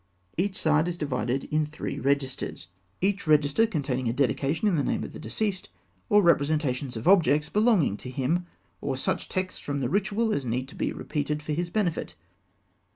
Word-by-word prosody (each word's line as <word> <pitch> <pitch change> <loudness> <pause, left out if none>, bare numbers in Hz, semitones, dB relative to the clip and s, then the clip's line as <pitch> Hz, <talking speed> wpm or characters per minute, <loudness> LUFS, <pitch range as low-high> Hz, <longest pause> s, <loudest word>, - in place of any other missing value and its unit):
Each 190 +3 0
side 155 +1 +3
is 175 -1 -2
divided 135 -3 -1
in 155 +1 +2
three 150 0 -5
registers, 135 -10 -1 0.3
each 200 -1 0
register 150 +7 +4
containing 135 - -1
a - - 0
dedication 140 - +1
in 195 - +3
the 145 - +1
name - - -1
of - - -7
the - - -8
deceased, 200 -4 -2 0.4
or 210 -2 +6
representations 145 -6 +2
of 110 - -5
objects 155 -6 +5
belonging 210 - +3
to 125 - -7
him, 150 +7 -1 0.3
or - - -2
such - - -1
texts 185 -1 -2
from 145 -1 -3
the 125 -3 -1
Ritual 210 +5 +1
as 140 - -1
need 125 +2 -2
to - - -12
be - - -1
repeated 150 0 -3
for 150 - -2
his 175 +3 -1
benefit. 180 -4 -1
150 Hz, 180 wpm, -27 LUFS, 135-185 Hz, 0.4 s, or